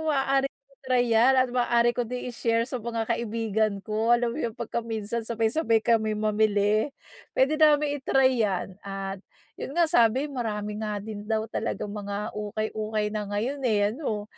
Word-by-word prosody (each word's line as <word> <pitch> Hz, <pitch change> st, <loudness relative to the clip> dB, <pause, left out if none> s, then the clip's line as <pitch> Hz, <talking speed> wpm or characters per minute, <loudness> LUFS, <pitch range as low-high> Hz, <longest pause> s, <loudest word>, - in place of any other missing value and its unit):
maaari 275 Hz, -1 st, +2 dB
kong 275 Hz, 0 st, -37 dB
i-try 255 Hz, -2 st, +2 dB
'yan 240 Hz, +4 st, +5 dB
at 255 Hz, -1 st, +4 dB
maaari 240 Hz, -1 st, +3 dB
ko 240 Hz, -1 st, -2 dB
din 250 Hz, 0 st, -4 dB
i-share 230 Hz, 0 st, +1 dB
sa 255 Hz, 0 st, -5 dB
mga 230 Hz, 0 st, -2 dB
kaibigan 220 Hz, -3 st, -1 dB
ko. 220 Hz, +2 st, +2 dB
Alam 235 Hz, -1 st, -1 dB
mo -, -, -6 dB
'yong 230 Hz, -2 st, -3 dB
'pagka 235 Hz, 0 st, -3 dB
minsan 225 Hz, 0 st, -3 dB
sabay-sabay 225 Hz, 0 st, +1 dB
kami 220 Hz, -2 st, +2 dB
mamili. 215 Hz, +1 st, +2 dB, 0.5 s
Puwede 300 Hz, +4 st, +2 dB
namin 295 Hz, -1 st, +4 dB
i-try 260 Hz, -2 st, +3 dB
'yan. 195 Hz, -2 st, -1 dB
At, 195 Hz, -1 st, -5 dB, 0.4 s
'yon 275 Hz, -, -6 dB
nga, 345 Hz, -, +5 dB
sabi 245 Hz, -2 st, +3 dB
marami 215 Hz, -6 st, -3 dB
nga 210 Hz, -1 st, -2 dB
din 210 Hz, -1 st, -7 dB
daw 220 Hz, -1 st, 0 dB
talagang 210 Hz, -2 st, -3 dB
mga 205 Hz, +1 st, -4 dB
ukay-ukay 215 Hz, 0 st, -2 dB
na 210 Hz, -1 st, -3 dB
ngayon, 235 Hz, +8 st, -2 dB
eh, 205 Hz, -1 st, +2 dB
ano? 220 Hz, -6 st, -3 dB
225 Hz, 165 wpm, -26 LUFS, 210-250 Hz, 0.5 s, yan